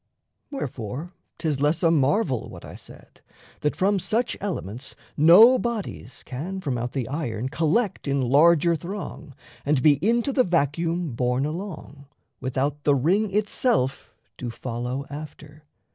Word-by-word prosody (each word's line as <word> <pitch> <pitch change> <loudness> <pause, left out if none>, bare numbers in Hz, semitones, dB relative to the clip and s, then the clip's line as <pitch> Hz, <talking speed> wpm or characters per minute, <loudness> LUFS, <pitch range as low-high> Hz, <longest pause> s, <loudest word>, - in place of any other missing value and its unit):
Wherefore, 145 - -5 0.2
'tis 155 -5 -1
less 150 +5 +1
a 165 - +5
marvel 145 - +1
what - - -11
I - - -9
said, - - -14 0.4
That 150 - -1
from 195 +1 +2
such 225 +6 0
elements 135 - -4 0.2
no 210 - +8
bodies 215 - -5
can 170 +9 -5
From 140 -9 -2
out 120 +1 -3
the 130 -5 -2
iron 130 -5 -3
collect 165 - 0
in 140 0 +1
larger 155 +6 +4
throng 175 -5 -7 0.3
And 140 -3 +1
be 145 -3 +5
into 235 +5 +2
the 255 - +4
vacuum 165 - 0
borne 125 +3 0
along, 155 -4 -7 0.3
Without 135 +3 -2
the 145 - +4
ring 190 +10 +1
itself 210 - 0 0.2
do 125 - -4
follow 125 +3 -4
after. 150 0 -10
150 Hz, 140 wpm, -24 LUFS, 135-185 Hz, 0.4 s, no